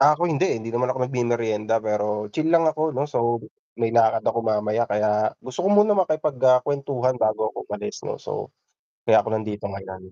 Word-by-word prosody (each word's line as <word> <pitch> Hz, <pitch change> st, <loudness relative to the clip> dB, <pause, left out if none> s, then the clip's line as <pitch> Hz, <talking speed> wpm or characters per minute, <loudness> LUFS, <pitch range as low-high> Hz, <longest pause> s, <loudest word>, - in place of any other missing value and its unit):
Ah, 150 Hz, +2 st, +6 dB
ako 175 Hz, -, 0 dB
hindi 150 Hz, -, +1 dB
eh, -, -, 0 dB
hindi 115 Hz, +1 st, -7 dB
naman 125 Hz, +1 st, +1 dB
ako 130 Hz, -, -2 dB
nagmemeryenda, 115 Hz, -4 st, 0 dB
pero 105 Hz, -1 st, -2 dB
chill 160 Hz, 0 st, 0 dB
lang 165 Hz, -1 st, +5 dB
ako 155 Hz, 0 st, +1 dB
'no 140 Hz, -, +1 dB
so 120 Hz, -5 st, 0 dB, 0.4 s
may 115 Hz, -1 st, 0 dB
lakad 115 Hz, -1 st, +4 dB
ako -, -, +1 dB
mamaya 110 Hz, 0 st, 0 dB
kaya 105 Hz, +1 st, +1 dB
gusto 130 Hz, +3 st, -7 dB
ko -, -, +3 dB
muna 210 Hz, +1 st, +5 dB
makipag 155 Hz, -6 st, 0 dB
ah 130 Hz, -1 st, +7 dB
kwentuhan 140 Hz, -3 st, -1 dB
bago 110 Hz, 0 st, +1 dB
ako -, -, -7 dB
umalis 105 Hz, 0 st, -6 dB
'no -, -, -4 dB
so -, -, -6 dB, 0.5 s
kaya -, -, +6 dB
ako -, -, -4 dB
nandito 105 Hz, -1 st, -4 dB
ngayon. 95 Hz, -1 st, -8 dB
115 Hz, 200 wpm, -23 LUFS, 105-140 Hz, 0.5 s, ah